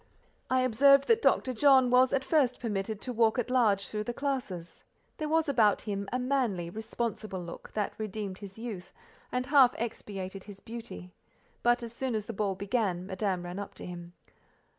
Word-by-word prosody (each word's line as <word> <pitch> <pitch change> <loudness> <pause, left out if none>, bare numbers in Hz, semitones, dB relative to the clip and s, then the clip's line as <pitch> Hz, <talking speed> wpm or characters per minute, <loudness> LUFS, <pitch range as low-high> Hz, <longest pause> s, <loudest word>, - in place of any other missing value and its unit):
I 255 0 +3
observed 275 +3 +5
that 460 0 +5
Dr. 255 - +2
John 260 0 +5
was 255 0 +5
at 265 -1 0
first 270 -5 +2
permitted 210 -2 -3
to 250 - -4
walk 225 0 +3
at 245 0 -1
large 210 -7 +3
through 210 0 -4
the 240 - -4
classes: 250 -12 -4 0.3
there 310 -2 -3
was 320 0 +2
about 225 -7 +3
him 200 -2 -3
a 250 - 0
manly, 250 -10 -1
responsible 220 -2 -4
look, 170 -1 -9
that 210 -2 -1
redeemed 210 -3 -4
his 200 -1 -10
youth, 215 -6 -7 0.4
and 250 0 -1
half 270 -2 +5
expiated 195 -4 -5
his 200 -2 -11
beauty; 195 - -9 0.5
but 240 +1 +3
as 230 -1 -7
soon 255 -1 -2
as 215 -1 -2
the 230 - -5
ball 200 -2 -1
began, 195 -2 -1
Madame 190 -1 -2
ran 175 +2 -6
up 200 - -7
to - - -8
him. 175 -1 -8
220 Hz, 185 wpm, -30 LUFS, 195-255 Hz, 0.5 s, observed